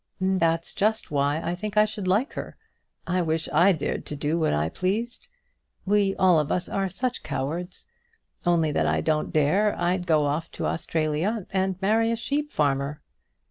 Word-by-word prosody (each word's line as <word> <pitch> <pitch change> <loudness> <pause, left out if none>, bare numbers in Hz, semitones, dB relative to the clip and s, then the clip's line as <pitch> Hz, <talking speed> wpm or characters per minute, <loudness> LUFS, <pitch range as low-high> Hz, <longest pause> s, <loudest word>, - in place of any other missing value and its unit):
"That's 170 -3 +1
just 215 -1 0
why 145 +1 +1
I 170 - -1
think 210 +4 -5
I 210 - +7
should 210 -3 -5
like 210 +10 +1
her. - - -7 0.5
I 180 0 0
wish 160 -1 -1
I 190 +3 +6
dared 160 -6 -2
to 150 - -4
do 150 +3 -1
what 160 - +2
I 75 +1 +1
pleased! 205 - -3 0.6
We 200 -1 +2
all 180 -4 +4
of 150 0 -1
us 180 - 0
are 195 -1 -1
such 245 +7 -3
cowards. 155 +5 -4 0.6
Only 170 -3 +2
that 80 - +1
I 80 0 +1
don't 155 - 0
dare, 185 +8 +2
I'd 180 +1 0
go 155 -3 +4
off 155 +4 -1
to - - -4
Australia 165 +7 -1
and 190 -1 0
marry 225 +3 +3
a 230 - +1
sheep 285 +6 -2
farmer." 140 0 0
175 Hz, 180 wpm, -25 LUFS, 155-200 Hz, 0.6 s, I